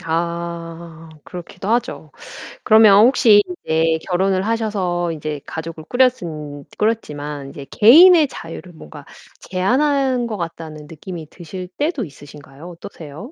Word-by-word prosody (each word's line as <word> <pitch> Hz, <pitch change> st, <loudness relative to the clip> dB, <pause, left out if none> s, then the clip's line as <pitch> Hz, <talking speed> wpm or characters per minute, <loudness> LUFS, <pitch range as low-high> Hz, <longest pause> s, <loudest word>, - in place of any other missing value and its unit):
아 170 Hz, 0 st, -5 dB, 0.2 s
그렇기도 180 Hz, +2 st, -9 dB
하죠. 235 Hz, +2 st, -2 dB, 0.5 s
그러면 215 Hz, -1 st, +6 dB
혹시 225 Hz, -5 st, +5 dB, 0.2 s
인제 160 Hz, 0 st, +1 dB
결혼을 190 Hz, +1 st, 0 dB
하셔서 200 Hz, -6 st, -1 dB
인제 155 Hz, -2 st, -5 dB
가족을 160 Hz, -1 st, -7 dB
꾸렸은 160 Hz, -, -1 dB
꾸렸지만 150 Hz, -10 st, -3 dB
인제 140 Hz, 0 st, -10 dB
개인의 320 Hz, -, +7 dB
자유를 175 Hz, -5 st, -10 dB
뭔가 75 Hz, -, -13 dB, 0.3 s
제한한 255 Hz, +6 st, 0 dB
것 215 Hz, -2 st, -5 dB
같다는 160 Hz, -3 st, -7 dB
느낌이 165 Hz, 0 st, -9 dB
드실 180 Hz, +1 st, -9 dB
때도 295 Hz, -3 st, -1 dB
있으신가요? 145 Hz, +1 st, -13 dB
어떠세요? 165 Hz, -, -11 dB
175 Hz, 295 characters per minute, -19 LUFS, 160-220 Hz, 0.5 s, 개인의